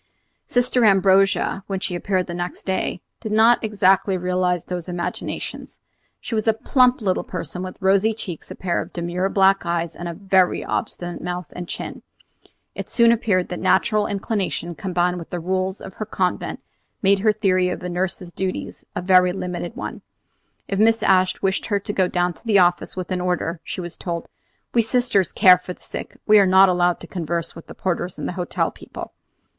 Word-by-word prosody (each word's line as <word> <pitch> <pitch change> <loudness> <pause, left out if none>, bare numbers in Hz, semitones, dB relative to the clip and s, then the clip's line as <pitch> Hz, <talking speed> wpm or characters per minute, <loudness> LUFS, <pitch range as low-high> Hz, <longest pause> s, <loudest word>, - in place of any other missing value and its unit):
Sister 245 0 +2
Ambrogia, 195 -1 +3
when 195 -1 -2
she 185 - -2
appeared 185 +1 -1
next 175 0 -5
day, 190 -1 -1 0.2
did 220 - -5
not 225 +3 +5
exactly 195 -2 +3
realize 180 -1 0
these 180 -1 -5
imaginations. 175 -1 -5 0.4
She - - -7
was 215 0 0
a 220 - +4
plump 250 +2 +3
little 190 -3 0
person, 180 0 -5
with 185 0 -6
rosy 200 +3 +3
cheeks, 180 -7 -7
a - - -7
pair 175 -2 -1
of - - -8
demure 175 +2 -2
black 195 0 +4
eyes, 170 -1 -2
and 175 - -6
a 170 - -5
very 190 -1 +2
obstinate 175 0 -4
mouth 180 -2 -5
and 175 -1 -6
chin. - - -6 0.7
It - - -6
soon 235 -1 +5
appeared 205 -6 +1
that 180 - -4
natural 205 +3 +2
inclination 195 -4 -2
combined 180 0 -1
with 165 - -9
the 175 - -3
rules 185 +2 -1
of 190 - -9
her 215 - -5
convent 185 -4 -2 0.4
made 195 0 +4
her 215 +2 +4
theory 185 -4 +1
of 180 - -5
a - - -3
nurse's 180 0 -3
duties 190 +1 -4
a - - -3
very 180 -1 +5
limited 180 +2 -5
one. 255 - -6 0.7
If 195 - -2
Mrs. 225 +1 +4
Ashe 185 -1 +3
wished 195 0 0
her 205 -2 +1
to 205 +1 -5
go 185 -2 +2
down 180 0 0
to - - -18
the 220 -4 +3
office 175 -1 +2
with 185 -1 -5
an 180 -1 -1
order, 180 -2 -1
she - - -5
was 175 -1 -7
told: 170 -2 -5 0.4
"We 235 - +5
sisters 225 -5 +1
care 185 -3 +6
for 180 0 -7
the - - -23
sick; - - -7
we 210 -1 +7
are 195 - +5
not 190 +1 +7
allowed 175 -1 +2
to - - -8
converse 170 -1 -3
with 165 - -11
porters 175 -1 -2
and - - -4
hotel 180 -1 -1
people." - - -10
185 Hz, 190 wpm, -22 LUFS, 180-200 Hz, 0.7 s, we